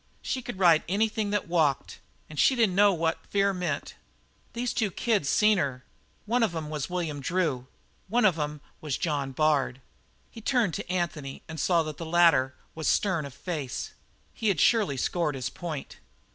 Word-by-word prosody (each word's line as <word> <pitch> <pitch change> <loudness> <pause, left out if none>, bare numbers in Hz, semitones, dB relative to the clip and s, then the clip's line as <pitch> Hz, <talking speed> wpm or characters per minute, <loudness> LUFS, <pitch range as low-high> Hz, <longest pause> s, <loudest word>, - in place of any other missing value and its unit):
She 260 - -2
could 235 - -7
ride 170 -4 +5
anything 215 +1 0
that 205 -3 -1
walked 160 -5 0 0.3
and 155 -2 -8
she 265 - +5
didn't 225 -6 +3
know 205 +2 +5
what 165 -2 -1
fear 200 0 +2
meant. 175 -5 -3 0.6
"These 240 +1 -2
two 220 -4 +1
kids 200 -5 0
seen 210 +3 +4
her. 130 -4 -2 0.4
One 240 +4 +1
of 210 -7 +1
'em 155 -2 -4
was 150 0 -3
William 170 -5 -3
Drew; 140 -5 -1 0.4
one 230 +3 +2
of 175 -5 +3
'em 150 0 -3 0.2
was 150 -4 -2
John 145 -4 -1
Bard." 140 -3 +1 0.5
He 225 - -10
turned 230 -7 +1
to 170 - -4
Anthony 165 -6 -3
and 160 0 -7
saw 170 +2 +3
that 155 -2 -6
the 165 - -6
latter 165 -6 +4 0.2
was 160 -1 -4
stern 170 -8 +1
of 140 - -12
face. 150 -7 -4 0.4
He 220 - -3
had 195 -7 +2
surely 210 - +3
scored 155 +1 0
his 130 -2 -3
point. 160 -5 -6
170 Hz, 180 wpm, -27 LUFS, 150-205 Hz, 0.6 s, ride